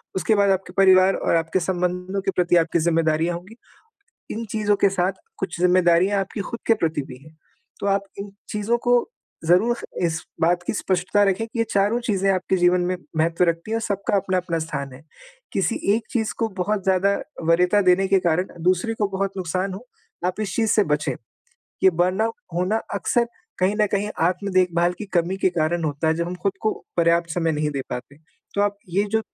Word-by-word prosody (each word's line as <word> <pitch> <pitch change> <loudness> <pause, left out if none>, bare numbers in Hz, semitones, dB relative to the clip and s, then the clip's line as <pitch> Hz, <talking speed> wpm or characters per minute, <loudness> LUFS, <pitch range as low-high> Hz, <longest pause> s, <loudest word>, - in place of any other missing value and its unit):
उसके 200 +4 +2
बाद 200 -1 +3
आपके 190 0 -2
परिवार 190 0 +6
और - - 0
आपके 165 +3 +1
संबंधों 180 +2 -2
के 195 0 -1
प्रति 175 -1 +2
आपकी 170 0 +2
ज़िम्मेदारियाँ 165 0 +1
होंगी। 185 +6 -10 0.8
इन 230 +2 -4
चीज़ों 210 -1 +1
के 200 - +4
साथ, 185 0 0 0.3
कुछ - - -4
ज़िम्मेदारियाँ 180 +2 +4
आपकी 195 +2 -5
ख़ुद 235 - -5
के 225 - +5
प्रति 160 -8 -1
भी 125 - -10
हैं, 155 0 -17 0.4
तो - - -2
आप 200 0 +2 0.2
इन 200 0 -6 0.2
चीज़ों 215 +2 0
को 245 0 +3 0.4
ज़रूर 185 +9 +3 0.3
इस 165 -1 0 0.2
बात 175 +2 +2
की - - 0
स्पष्टता 190 0 +1
रखें 200 +3 0
कि, 230 +1 -8
ये 230 - +3
चारों 205 +4 +2
चीज़ें 195 -4 +1
आपके 185 0 0
जीवन 180 0 +3
में 180 +1 -1 0.2
महत्व 165 +2 +2
रखती 170 +4 -1
हैं 225 - +1
और - - -1
सबका 200 -2 -1
अपना-अपना 185 -3 -1
स्थान 140 -4 -4
है। 130 - -13 0.5
किसी 195 +3 0 0.2
एक 225 - -1
चीज़ 220 -4 -1
को 225 - +1
बहुत 200 +1 -1
ज़्यादा 195 +1 +3 0.4
वरीयता 180 +4 +4
देने 190 +2 +3
के 195 0 +4
कारण, 175 +1 +1 0.2
दूसरी 185 +6 +1
को 205 - +1
बहुत 195 0 -2
नुकसान 185 +1 -2
हो 210 +7 -10 0.4
आप 185 +3 -2
इस 205 -4 -3
चीज़ 225 -2 +2
से 210 - +4
बचें। 150 -4 0 0.7
ये 190 - +7
बर्नआउट 185 +6 0 0.2
होना 180 +5 +1 0.2
अक्सर 235 +4 +1 0.3
कहीं 185 +2 +2
न 210 - +4
कहीं, 205 +1 0
आत्म-देखभाल 180 -1 +1
की - - -5
कमी 175 +2 +1
के 195 - +2
कारण 170 0 0
होता 150 +1 -1
है, 160 - +3
जब 170 +1 -2
हम 180 - -4
ख़ुद 195 - +1
को 215 - +1 0.2
पर्याप्त 170 0 +2
समय 165 0 0
नहीं 150 0 -1
दे 140 -2 -3
पाते। 125 +3 -6 0.4
तो 200 - 0
आप 205 0 0
ये 195 +4 +1
जो 220 - +3
185 Hz, 200 wpm, -23 LUFS, 170-200 Hz, 0.8 s, ये